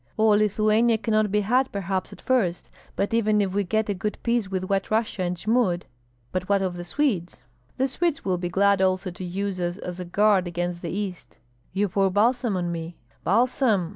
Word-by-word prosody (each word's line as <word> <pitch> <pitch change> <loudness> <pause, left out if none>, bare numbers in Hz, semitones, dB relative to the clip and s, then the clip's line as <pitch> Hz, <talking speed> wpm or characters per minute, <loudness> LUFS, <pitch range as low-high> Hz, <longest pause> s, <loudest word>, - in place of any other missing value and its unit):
"All 220 0 +4
Lithuania 215 +2 +3
cannot 215 -1 +1
be 210 +1 +2
had, 250 +6 +2
perhaps, 190 -1 -2
at - - -12
first, 205 -10 0 0.3
but 200 +3 -1
even 215 -2 +3
if 195 -2 0
we 205 +1 +1
get 220 +3 0
a 205 - 0
good 205 +3 -3
piece 235 -4 0
with 190 -1 -2
White 195 0 -1
Russia 215 -3 0
and 180 0 -1
Jmud 205 -3 +1 0.2
" 120 -1 -39
"But 185 +1 -3
what 200 -1 +3
of 185 -2 -2
the 175 - -6
Swedes?" 190 - -1 0.4
"The 265 - +2
Swedes 325 +3 -1
will 185 -2 0
be 175 -1 -2
glad 200 +2 +3
also 185 0 +1
to 175 +2 -8
use 190 +1 -3
us 175 0 -2
as 180 -3 -6
a 180 - -4
guard 195 0 +3
against 175 0 -3
the 170 - -4
East." 190 -2 -5 0.3
"You 200 +2 +1
pour 195 +1 +2
balsam 230 +2 +2
on 175 -1 -2
me." 165 0 -6 0.3
"Balsam! 225 -3 +2
195 Hz, 205 wpm, -25 LUFS, 180-215 Hz, 0.4 s, All